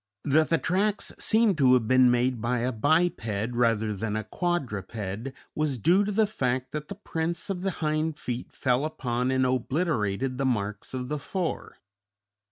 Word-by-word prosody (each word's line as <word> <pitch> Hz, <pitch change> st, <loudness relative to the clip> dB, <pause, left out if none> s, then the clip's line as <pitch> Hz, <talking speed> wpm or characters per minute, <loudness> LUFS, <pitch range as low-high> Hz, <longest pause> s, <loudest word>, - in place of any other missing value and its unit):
That 155 Hz, +2 st, +3 dB
the 165 Hz, -, +3 dB
tracks 200 Hz, +5 st, 0 dB
seemed 220 Hz, -6 st, +3 dB
to 130 Hz, -2 st, +6 dB
have 115 Hz, -3 st, +1 dB
been 130 Hz, 0 st, +6 dB
made 125 Hz, -1 st, +1 dB
by 120 Hz, +1 st, 0 dB
a 125 Hz, +2 st, 0 dB
biped, 115 Hz, -, +1 dB
rather 115 Hz, -3 st, +1 dB
than 105 Hz, +1 st, -3 dB
a 110 Hz, -, -1 dB
quadruped, 110 Hz, -, -3 dB, 0.2 s
was 150 Hz, -4 st, 0 dB
due 175 Hz, -, +4 dB
to 205 Hz, -, -2 dB
the 220 Hz, +2 st, +3 dB
fact 130 Hz, -10 st, -2 dB
that 150 Hz, -1 st, -5 dB
the 200 Hz, -, -6 dB
prints 170 Hz, -2 st, -3 dB
of 180 Hz, -2 st, -3 dB
the 195 Hz, -, 0 dB
hind 155 Hz, -2 st, -1 dB
feet 125 Hz, -1 st, -5 dB
fell 125 Hz, 0 st, +1 dB
upon 125 Hz, -5 st, -1 dB
and 130 Hz, 0 st, +2 dB
obliterated 130 Hz, -, 0 dB
the 135 Hz, -, +1 dB
marks 105 Hz, -2 st, -2 dB
of 125 Hz, -1 st, -3 dB
the 150 Hz, +2 st, -2 dB
fore. 180 Hz, +3 st, -4 dB
130 Hz, 175 wpm, -27 LUFS, 120-160 Hz, 0.2 s, to